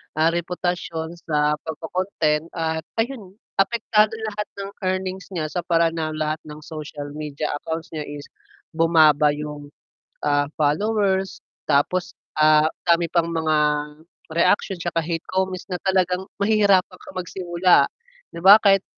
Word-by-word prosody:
ah, 160 +2 +3
reputasyon 170 -1 -3
sa 150 -2 0
pagko-content 160 -1 -1
at 160 -1 -1 0.2
ayun, 225 -5 -3 0.2
apektado 215 +1 +2
lahat 210 -1 -3
ng 200 0 -6 0.2
earnings 185 0 -3
niya 155 -2 -2
sa 180 - -2
paraan 165 -1 +2
ng 155 -1 -2
lahat 155 0 -1
ng 150 0 -9
social 150 -2 -7
media 150 0 -4
accounts 160 +1 -5
niya 155 -2 -5
is 145 0 -7 0.5
bumaba 155 -3 +4
yung, 150 -1 -7 0.5
ah, 145 -1 +2 0.2
followers, 190 +4 +1 0.2
tapos 155 +5 +1 0.2
ah, 155 0 +5 0.2
dami 170 -1 +3
pang 170 0 0
mga 160 -1 +1 0.7
reaksyon 180 +4 +2
'tsaka 170 -1 -1
hate 165 0 -3
comments 185 -1 -1
na 180 - -2
talagang 185 0 0
mahihirapan 200 -3 +3
kang - - -13
magsimula 180 0 +2 0.4
'di 170 - -9
ba? 200 +3 +10
Kahit 195 -2 +4
170 Hz, 135 wpm, -22 LUFS, 155-190 Hz, 0.7 s, ba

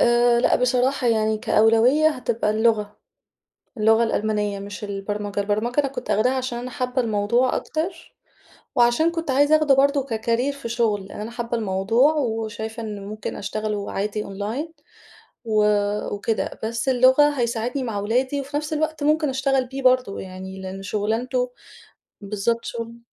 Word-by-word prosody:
آآ، 240 0 +4
لأ - - +3
بصراحة 250 +1 +1
يعني 220 -1 +2
كأولويّة 225 +9 +4
هتبقى 235 -7 -1
اللغة. 215 -1 +1 0.8
اللغة 225 +1 +4
الألمانية 210 -2 -1
مش 205 +1 -7
البرمجة، 205 0 -3
البرمجة 215 +6 0
أنا 280 - -1
كنت 260 -2 -6
آخداها 235 +5 +3
عشان 255 -2 -3
أنا 250 +1 -6
حابة 250 +1 -1
الموضوع 230 +3 +1
أكتر، 320 +5 -5 0.6
وعشان 240 +6 +4
كنت 330 -3 -3
عايزة 290 +3 +5
أخده 305 -3 +4
برضو 280 +1 +3
ككرير 230 +2 -1
في 275 -4 -7
شغل 220 -4 0
لأن - - -9
أنا 215 +2 -5
حابة 235 0 -3
الموضوع 225 +8 +2
وشايفة 225 -4 -3
إنه 210 -2 -5
ممكن 210 +1 -6
أشتغل 215 +1 -3
وعادي 205 +1 -3
أونلاين 215 +11 -4 0.7
و 215 -2 +2 0.5
وكده 220 +2 -2
بس 230 +3 -1
اللغة 260 +3 +5
هيساعدني 240 +3 -1
مع 225 -4 -3
أولادي، 250 +7 0
وفي 285 +2 -4
نفس 300 +1 -3
الوقت 310 -1 -1
ممكن 305 0 +2
اشتغل 265 0 +1
بيه 270 +2 -6
برضو 255 -5 +3
يعني، 190 0 -8
لإن 190 +1 -6
شُغلانته 235 +5 -1 0.7
بالضبط 210 +3 -1
شغل 230 0 -6
235 Hz, 150 wpm, -23 LUFS, 210-260 Hz, 0.8 s, عايزة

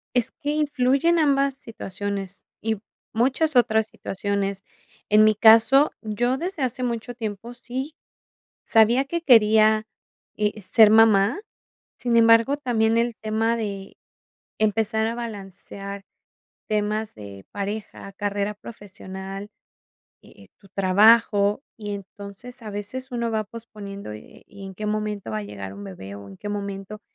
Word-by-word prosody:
Es 245 - +2
que 295 -2 -4
influyen 295 +2 +2
ambas 275 -3 +2
situaciones 200 -4 -5 0.2
y 220 0 -1 0.4
muchas 265 +6 +1
otras 220 -3 +3
situaciones. 200 -1 -3 0.5
En 210 +1 +6
mi 215 0 +5
caso, 230 +6 +6
yo 240 +5 0
desde 350 0 -4
hace 255 0 -2
mucho 240 0 -3
tiempo 225 0 -6
sí, 260 +5 -6 0.7
sabía 230 +4 +4
que 335 +4 -3
quería, 220 -4 +5 0.5
eh, 210 0 -1
ser 215 +3 +5
mamá. 220 - +5 0.6
Sin 235 -1 +1
embargo, 230 +4 +5
también 230 -5 +1
el 235 -1 0
tema 220 +2 0
de 200 -4 -5 0.6
empezar 220 +1 +1
a 230 - -3
balancear 200 -3 -7 0.6
temas 215 0 -1
de 100 -2 -11
pareja, 205 0 -5
carrera 205 +1 -2
profesional, 195 -2 -9 0.8
eh - - -18
eh, - - -18
tu 195 - -20
trabajo, 205 +3 +4
y 210 -3 -6
entonces, 200 +5 -10
a 215 - -7
veces 215 +6 -6
uno 235 -1 -1
va 220 -1 -1
posponiendo, 205 - -9
eh 105 - -12
eh, - - -22
y 200 -1 -11
en 190 - -9
qué 210 +3 -5
momento 210 - -3
va 110 - -2
a - - -4
llegar 100 -1 -7
un 100 +1 -9
bebé 95 +1 -9
o 100 - -11
en 95 - -12
qué 205 - -7
momento 200 0 -5
215 Hz, 140 wpm, -24 LUFS, 200-235 Hz, 0.8 s, En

